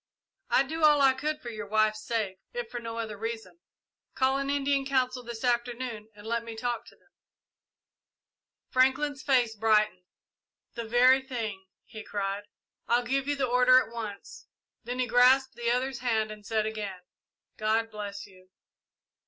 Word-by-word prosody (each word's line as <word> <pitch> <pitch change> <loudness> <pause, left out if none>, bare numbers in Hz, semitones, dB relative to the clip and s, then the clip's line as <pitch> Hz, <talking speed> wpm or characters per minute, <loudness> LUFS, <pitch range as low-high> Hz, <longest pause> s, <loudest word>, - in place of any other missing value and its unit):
"I'd 270 - +3
do 320 +2 -4
all 300 -1 +6
I 270 -1 +6
could 300 +3 -3
for 240 - -5
your 210 -2 -6
wife's 215 0 +2
sake, 210 -5 -2
if 240 -2 -5
for 240 - -4
no 230 -1 -6
other 220 -2 -4
reason. 225 +8 -5 0.6
Call 265 +1 +2
an 275 0 -2
Indian 280 -1 +1
council 260 -2 0
this 235 -1 -8
afternoon 240 -2 -1
and 205 0 -14
let 235 +1 -1
me 230 -1 -8
talk 240 +1 -3
to - - -15
them." - - -33 1.6
Franklin's 265 +2 +2
face 245 -5 +2
brightened. 215 -3 +2 0.7
"The 235 -1 -5
very 250 +3 +5
thing!" 220 -7 -5 0.2
he 220 -1 -9
cried. 200 0 -3 0.4
"I'll 240 +1 +3
give 270 +3 0
the 280 -2 +1
order 250 +1 +5
at 245 -2 +1
once." 215 -4 -7 0.4
Then 245 +2 -4
he 255 - +1
grasped 260 +2 +4
the 235 0 -2
other's 255 +1 0
hand 220 -3 0
and 210 -1 -10
said 220 -1 +1
again, 210 -4 -5 0.6
"God 220 +1 0
bless 205 -1 -6
you!" 185 -2 -19
235 Hz, 160 wpm, -28 LUFS, 215-260 Hz, 1.6 s, all